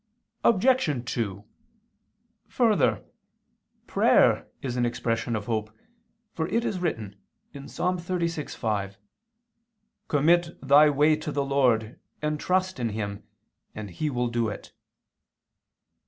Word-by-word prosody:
Obj. 190 - +2
2: 100 -4 -3 1.0
Further, - - +2 0.8
prayer - - +3 0.2
is 125 -3 -3
an 125 - +1
expression 120 -1 -1
of 105 -1 -4
hope, 110 -2 -2 0.6
for 160 0 -2
it 230 +6 0
is 190 - -2
written 110 - -3 0.4
(Ps. 140 0 -10
36:5): 165 - -2 1.1
"Commit 170 +4 +2
thy 145 +2 +6
way 150 +2 +4
to 155 0 -5
the 140 -1 -1
Lord, 125 -5 +1 0.2
and 150 0 -2
trust 185 -1 0
in 120 -2 -1
Him, 100 -1 -4 0.5
and 105 -2 -7
He 155 - -2
will 125 -3 -1
do 115 -1 0
it." 105 - -8
135 Hz, 110 wpm, -26 LUFS, 115-165 Hz, 1.1 s, thy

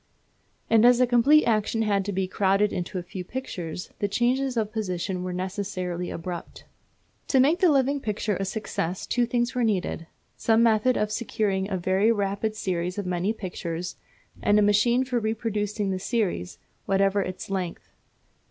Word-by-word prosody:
And 225 -1 +4
as 245 0 +6
a 250 - +5
complete 250 +6 +5
action 225 0 +1
had 200 -2 +1
to 205 - -2
be 190 -1 -1
crowded 195 +2 +2
into 180 +1 -3
a 180 - -3
few 180 +1 -7
pictures, 180 -7 -6
the 205 - +1
changes 250 +4 0
of 215 -2 0
position 185 -4 -3
were 180 0 -3
necessarily 185 -1 -3
abrupt. 170 0 -7 0.6
To 265 - +3
make 300 +7 +4
the 365 - +5
living 280 0 +2
picture 210 -3 -2
a 195 - -2
success 190 -3 -3
two 245 -1 +1
things 240 0 0
were 250 -1 0
needed; 185 -6 -1 0.3
some 225 0 +3
method 230 +2 +3
of 210 0 0
securing 210 -3 -1
a 190 - -1
very 190 +5 +2
rapid 205 0 -1
series 180 -3 -2
of 205 - -3
many 180 +3 0
pictures, 180 -4 -5 0.5
and 205 - +3
a 210 - +5
machine 235 +5 +3
for 250 -2 0
reproducing 210 -2 -2
the 185 - -2
series, 180 - -2 0.3
whatever 195 +1 +2
its 185 +1 -5
length. 185 -3 -4
205 Hz, 170 wpm, -26 LUFS, 185-230 Hz, 0.6 s, as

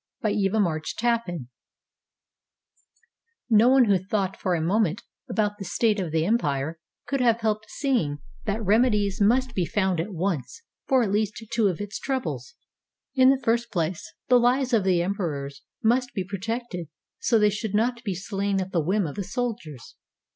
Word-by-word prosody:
] - - -60
BY 215 - +2
EVA 205 +1 +1
MARCH 160 -6 -1
TAPPAN 215 - -1 2.0
No 225 +3 +6
one 265 -1 +6
who 200 -4 +3
thought 195 +1 -2
for 185 -2 -1
a - - -1
moment 200 +3 +1 0.3
about 210 -1 0
the - - -4
state 210 +3 +1
of 175 -5 -3
the 160 0 +1
empire 160 -7 0 0.3
could 275 -2 -1
have 235 -2 +3
helped 220 0 -1
seeing 235 - 0 0.3
that 215 0 -2
remedies 210 -2 +2
must 245 +4 +3
be 185 - 0
found 190 -1 0
at 175 +6 -3
once 180 - -3 0.2
for 260 -3 +4
at 205 - -1
least 215 +2 -1
two 225 -3 +3
of 180 -4 -1
its 205 0 -5
troubles. 270 - -3 0.6
In 260 -1 +6
the 270 - +4
first 235 0 +1
place, 170 -2 -2 0.2
the 250 -1 +6
lives 250 +2 +2
of 220 -4 +4
the 180 -2 +3
emperors 150 -8 -3 0.2
must 250 +4 +2
be 190 - -1
pro 200 -1 -5
tected 225 -5 -4 0.3
so 230 - +3
they 210 -1 +4
should 210 0 -3
not 235 +2 +1
be 200 -5 -2
slain 195 +1 -1
at 190 0 -4
the 170 - +1
whim 190 +5 +1
of 145 - -4
the 200 - -4
soldiers. 205 - -5
205 Hz, 180 wpm, -25 LUFS, 180-235 Hz, 2.0 s, No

